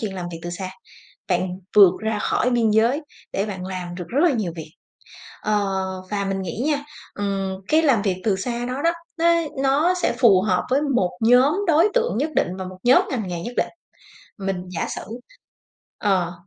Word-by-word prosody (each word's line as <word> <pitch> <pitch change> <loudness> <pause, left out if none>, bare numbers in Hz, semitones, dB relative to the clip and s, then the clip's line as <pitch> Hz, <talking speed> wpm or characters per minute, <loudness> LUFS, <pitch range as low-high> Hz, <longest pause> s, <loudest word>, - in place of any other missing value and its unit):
chuyện 210 -4 -3
làm 180 -2 -5
việc 165 - -6
từ 175 - -5
xa, 185 +1 -5 0.6
bạn 180 0 +1 0.3
vượt 200 -4 +9
ra 220 -1 -1
khỏi 245 - +1
biên 235 -2 +2
giới 230 +7 +3 0.3
để 195 - 0
bạn 190 -3 -6
làm 180 -2 -5
được 180 -1 -6
rất 265 - -1
là 345 - +5
nhiều 190 -7 -2
việc. 155 -1 -8 0.7
Ờ, 210 -1 +1 0.5
và 200 -1 -1
mình 195 0 -2
nghĩ 190 +6 -4
nha, 290 -2 0 0.3
ừm, 195 -1 -2
cái 315 +1 +4
làm 260 -10 +3
việc 195 -3 0
từ 205 -3 +2
xa 240 +4 -3
đó 255 +3 -3
đó, 335 - +4 0.3
nó 335 - +2 0.4
nó 295 +7 +3
sẽ 360 - 0
phù 205 -7 +6
hợp 180 -3 +1
với 275 +3 +2
một 245 -11 +1
nhóm 250 +5 +5
đối 335 +3 +5
tượng 480 - +1
nhất 305 +3 0
định - - +3
và 190 - -4
một 185 0 -9
nhóm 245 +2 +6
ngành 220 -7 -2
nghề 175 -1 -4
nhất 240 +5 -6
định. - - +1 0.7
Mình 195 -1 -2 0.2
giả - - -1
sử - - -5 1.0
ờ, 185 -4 +1
210 Hz, 200 wpm, -22 LUFS, 185-260 Hz, 1.0 s, vượt